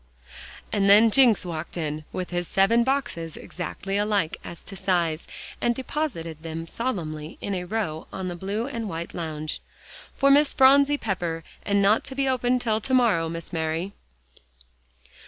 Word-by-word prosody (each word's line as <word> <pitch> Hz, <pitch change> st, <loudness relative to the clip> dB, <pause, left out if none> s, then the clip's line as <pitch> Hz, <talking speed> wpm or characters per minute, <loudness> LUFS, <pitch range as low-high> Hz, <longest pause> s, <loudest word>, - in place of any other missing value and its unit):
And 200 Hz, -1 st, +3 dB
then 215 Hz, +3 st, +7 dB
Jencks 240 Hz, -6 st, +5 dB
walked 165 Hz, 0 st, -5 dB
in 155 Hz, -2 st, -3 dB
with 180 Hz, -1 st, -4 dB
his 175 Hz, -1 st, -2 dB
seven 230 Hz, +5 st, +3 dB
boxes 235 Hz, -, -2 dB
exactly 195 Hz, +2 st, -4 dB
alike 205 Hz, -6 st, +1 dB
as 170 Hz, -, -9 dB
to 195 Hz, -, -8 dB
size, 170 Hz, -4 st, 0 dB, 0.3 s
and 240 Hz, 0 st, +2 dB
deposited 235 Hz, -, -4 dB
them 165 Hz, 0 st, -5 dB
solemnly 160 Hz, -8 st, -4 dB
in 200 Hz, -, -3 dB
a 180 Hz, -1 st, -3 dB
row 180 Hz, -6 st, -3 dB
on 190 Hz, -, -4 dB
the 175 Hz, -, -4 dB
blue 200 Hz, +6 st, -3 dB
and 230 Hz, -6 st, -4 dB
white 165 Hz, 0 st, -5 dB
lounge. 155 Hz, -2 st, -4 dB, 0.5 s
"For 275 Hz, 0 st, +4 dB
Miss 290 Hz, +1 st, +5 dB
Phronsie 280 Hz, +2 st, +6 dB
Pepper, 175 Hz, -8 st, -3 dB, 0.2 s
and 200 Hz, -1 st, +2 dB
not 205 Hz, +3 st, +4 dB
to 265 Hz, -, -7 dB
be 275 Hz, 0 st, +1 dB
opened 250 Hz, -1 st, +1 dB
till 220 Hz, -2 st, 0 dB
to 260 Hz, -, -2 dB
morrow, 205 Hz, -10 st, +3 dB
Miss 165 Hz, +1 st, -6 dB
Mary." 165 Hz, +4 st, -2 dB
195 Hz, 160 wpm, -25 LUFS, 165-235 Hz, 0.5 s, then